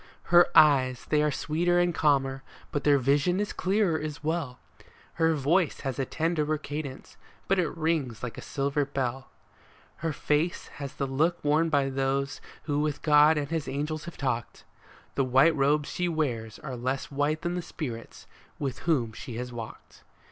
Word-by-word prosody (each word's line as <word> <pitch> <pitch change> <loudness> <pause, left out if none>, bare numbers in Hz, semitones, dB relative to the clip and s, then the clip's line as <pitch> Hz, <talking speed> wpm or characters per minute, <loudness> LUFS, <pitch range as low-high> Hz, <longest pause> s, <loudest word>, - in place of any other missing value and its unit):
Her 175 0 +8
eyes 130 -5 +5
they 150 -1 +2
are 150 - +2
sweeter 170 +5 0
and 175 -1 +2
calmer, 135 -3 +1 0.3
but 145 - -2
their 145 -1 +5
vision 145 +8 +2
is 205 - -2
clearer 190 -4 +1
as 150 -1 -6
well; 155 -5 -2 0.6
Her 160 0 +4
voice 155 +4 +1
has 135 -2 -3
a 135 - +1
tenderer 155 0 0
cadence, 145 -2 -7 0.3
but 195 -1 +2
it 170 -2 -1
rings 155 -9 -1
like 115 -2 -4
a - - -8
silver 140 +1 -1
bell. 135 -1 -3 0.7
Her 165 0 -2
face 150 +3 -1
has 140 -2 -6
the 140 - -1
look 155 +6 0
worn 155 +3 +3
by 140 -3 +1
those 135 0 -1 0.2
who 145 -2 -1
with 150 -1 -2
God 150 +1 +6
and 145 -1 -2
his 165 -2 -2
angels 150 +2 -3
have 170 - -9
talked; 130 -4 -3 0.5
The 135 - +1
white 135 +6 +4
robes 145 +1 +2
she 180 0 -1
wears 120 -9 -2
are 135 -4 -6
less 130 +4 -3
white 145 +3 0
than 175 - -1
the 180 - -2
spirits 120 -9 -7 0.3
with 135 -3 -3
whom 120 -9 +1
she 115 +2 -8
has 125 +1 -5
walked. 115 -2 -9
145 Hz, 175 wpm, -28 LUFS, 135-160 Hz, 0.7 s, Her